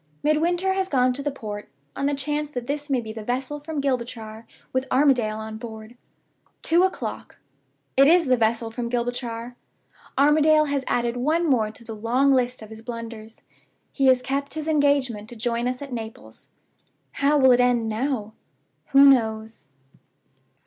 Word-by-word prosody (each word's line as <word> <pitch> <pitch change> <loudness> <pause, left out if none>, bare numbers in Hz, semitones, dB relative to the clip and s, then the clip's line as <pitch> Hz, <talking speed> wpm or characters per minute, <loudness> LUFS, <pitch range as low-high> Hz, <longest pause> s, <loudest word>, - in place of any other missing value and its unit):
Midwinter 345 +5 +1
has 380 0 -1
gone 255 -2 +2
to 275 - -5
the 290 - -1
port, 210 -6 -7 0.3
on 275 - -1
the 285 - 0
chance 295 +2 -2
that 245 -4 -5
this 290 +2 -4
may 265 -2 +2
be 220 -1 -7
the 220 -1 -7
vessel 260 +5 -3
from 300 0 -5
Gibraltar, 235 -5 -3 0.3
with 260 +1 -1
Armadale 250 -6 +2
on 220 0 -6
board. 220 0 -9 0.7
"Two 335 +2 +3
o'clock. 375 0 -3 0.6
It 275 +1 +6
is 340 +1 +5
the 255 -2 +3
vessel 225 0 0
from 235 0 -4
Gibraltar. 240 0 -3 0.6
Armadale 305 +2 +5
has 285 -2 -1
added 240 0 0
one 315 +7 +1
more 230 -7 +2
to 225 - -13
the 225 -1 -7
long 245 +6 +2
list 250 -3 +1
of 215 - -12
his 220 0 -10
blunders: 230 -2 -8 0.5
he 270 -2 +1
has 255 -1 +4
kept 280 +2 -3
his 310 0 -4
engagement 280 -8 +1
to 240 - -10
join 235 +1 -1
us 250 +2 -3
at 275 -3 -8
Naples. 225 -2 -8 0.6
"How 285 +2 +2
will 265 -2 +6
it 245 - +4
end 245 -2 +2
now? 220 -1 -2 0.6
"Who 275 +1 +8
knows?" 220 - +1
250 Hz, 170 wpm, -24 LUFS, 230-285 Hz, 0.7 s, Who